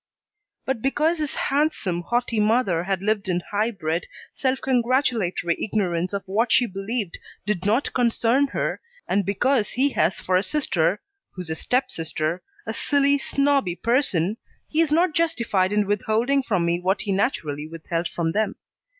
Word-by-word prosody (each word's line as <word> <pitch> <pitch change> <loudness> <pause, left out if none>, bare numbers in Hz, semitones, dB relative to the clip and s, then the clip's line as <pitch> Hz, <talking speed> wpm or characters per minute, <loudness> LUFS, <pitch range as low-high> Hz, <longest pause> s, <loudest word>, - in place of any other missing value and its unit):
But 260 -4 -1
because 305 +6 +1
his 300 -2 -2
handsome, 275 - 0
haughty 240 +3 -1
mother 210 -6 +2
had 190 -1 -1
lived 210 -2 0
in 175 -1 +1
high 210 +2 +1
bred, 170 -6 -3 0.3
self 265 -1 0
congratulatory 240 - +1
ignorance 185 -5 0
of 200 -1 -3
what 220 +5 0
she 245 - +5
believed 195 -1 -4 0.3
did 200 -2 -1
not 230 +7 +1
concern 245 +2 +2
her, - - -2 0.3
and 200 - +1
because 225 +3 +2
he 270 +3 +1
has 190 - +1
for 185 - 0
a 185 - +4
sister, 190 - 0 0.3
who's 180 -3 -5
a - - -1
step 250 +10 0
sister, 160 +1 -2 0.2
a - - -3
silly, 285 -1 +2
snobby 275 -11 +1
person, 215 - +1 0.3
he 315 - +1
is 320 -3 +1
not 335 +2 +3
justified 235 - +1
in 210 0 +2
withholding 220 +7 +1
from 195 -9 0
me 170 0 +1
what 190 +3 0
he 200 - -2
naturally 155 - -1
withheld 165 +1 -3
from 165 -1 -2
them. 215 +4 0
210 Hz, 160 wpm, -24 LUFS, 180-260 Hz, 0.3 s, she